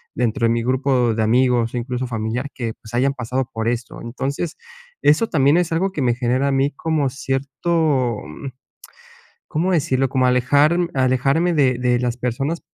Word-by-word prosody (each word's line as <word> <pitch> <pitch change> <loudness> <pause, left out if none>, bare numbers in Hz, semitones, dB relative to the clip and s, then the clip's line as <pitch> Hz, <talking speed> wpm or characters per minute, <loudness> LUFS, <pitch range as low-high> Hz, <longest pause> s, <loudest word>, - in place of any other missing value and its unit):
dentro 120 0 0
de 115 - +2
mi 115 - 0
grupo 130 -2 +1
de 110 - 0
amigos, 120 0 +2
incluso 125 +1 -3
familiar, 115 +4 -3
que 115 -3 -4
pues, 110 +1 -15
hayan 135 +3 +2
pasado 130 0 -3
por 110 0 -2
esto. 120 -1 -4
Entonces, 135 +7 -4 0.4
eso 155 +10 +3
también 145 -3 +3
es 175 -2 0
algo 185 +4 0
que 150 - -3
me 120 -1 +2
genera 125 +3 0
a - - 0
mí 135 +2 +1
como 155 -4 0
cierto, 135 -1 -1
mm, 105 - -8 1.0
¿cómo 175 +5 0
decirlo? 135 -5 +1
Como 130 0 +1
alejarm 145 +7 +3
alejarme 135 +6 +2
de 130 -5 +2
de 125 -1 +1
las 120 -1 -1
personas, 135 +7 -2
130 Hz, 170 wpm, -20 LUFS, 120-145 Hz, 1.0 s, eso